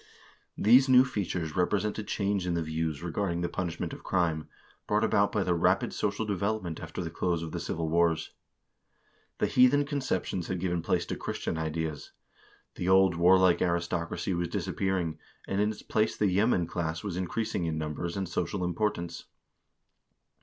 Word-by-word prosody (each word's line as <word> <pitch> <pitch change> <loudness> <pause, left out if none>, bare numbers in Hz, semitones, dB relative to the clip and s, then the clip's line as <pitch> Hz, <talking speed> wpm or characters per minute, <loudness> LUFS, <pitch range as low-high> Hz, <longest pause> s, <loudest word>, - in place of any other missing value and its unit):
These 125 +5 +6
new 130 0 +7
features 90 - -3
represent 105 +4 0
a - - -3
change 100 -3 -1
in 85 - 0
the 85 - 0
views 80 -1 -3
regarding 85 0 -1
the 85 - 0
punishment 85 -2 -3
of - - -9
crime, 80 -5 0 0.4
brought - - +2
about - - +3
by - - +1
the 90 - +1
rapid 85 - +2
social 110 - -1
development 100 -4 -2
after 80 +2 -5
the 80 - -5
close 85 0 -1
of 80 - -6
the 85 - -3
civil 80 -1 -3
wars. 85 0 +1 1.1
The - - +1
heathen 130 +3 +4
conceptions 130 - -2
had 95 - -2
given 90 -1 -1
place - - 0
to - - -3
Christian - - -3
ideas; 80 -1 -3 0.6
the 90 - -2
old 95 -1 +5
warlike 90 0 +5
aristocracy 85 +1 -1
was 85 0 -1
disappearing, 85 -2 -2 0.3
and 100 +1 0
in 105 - +2
its 110 - -7
place 110 0 0
the 105 - +2
yeoman 95 -2 +2
class 80 -1 -3
was 100 -4 -3
increasing 95 0 -2
in 80 -1 -2
numbers 80 +3 -3
and 95 -1 -2
social 90 +2 -2
importance. 85 -2 -2
90 Hz, 165 wpm, -29 LUFS, 85-100 Hz, 1.1 s, new